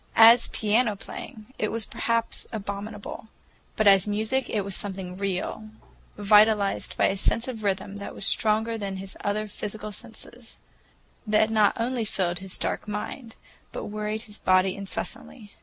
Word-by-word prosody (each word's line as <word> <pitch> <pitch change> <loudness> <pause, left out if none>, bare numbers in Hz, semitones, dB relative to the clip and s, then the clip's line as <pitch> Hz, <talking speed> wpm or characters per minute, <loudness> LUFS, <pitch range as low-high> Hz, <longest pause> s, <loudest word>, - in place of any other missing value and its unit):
As 230 +2 +8
piano 215 +1 +1
playing, 215 +2 -9
it 215 - 0
was 225 -1 0
perhaps 230 0 -1
abominable, 205 0 -6 0.5
but 215 - +1
as 195 -1 +6
music 220 +6 0
it 210 - 0
was 200 0 -3
something 190 -3 -4
real, 200 +2 -3 0.5
vitalized 210 0 +4
by - - +4
a 195 - +2
sense 230 +4 +1
of 230 -4 -6
rhythm 195 0 -1
that 200 - -7
was - - -3
stronger 220 +1 +1
than 195 -2 -4
his 190 0 -7
other 210 +1 0
physical 210 +1 -6
senses,—that 220 0 -5
not 215 -2 +4
only 240 0 0
filled 180 -4 -1
his 190 -1 -5
dark - - -3
mind, 225 +3 -5 0.4
but - - -5
worried 215 +1 -3
his 210 -2 -12
body 185 0 +3
incessantly. 205 +2 -5
210 Hz, 150 wpm, -26 LUFS, 200-220 Hz, 0.5 s, As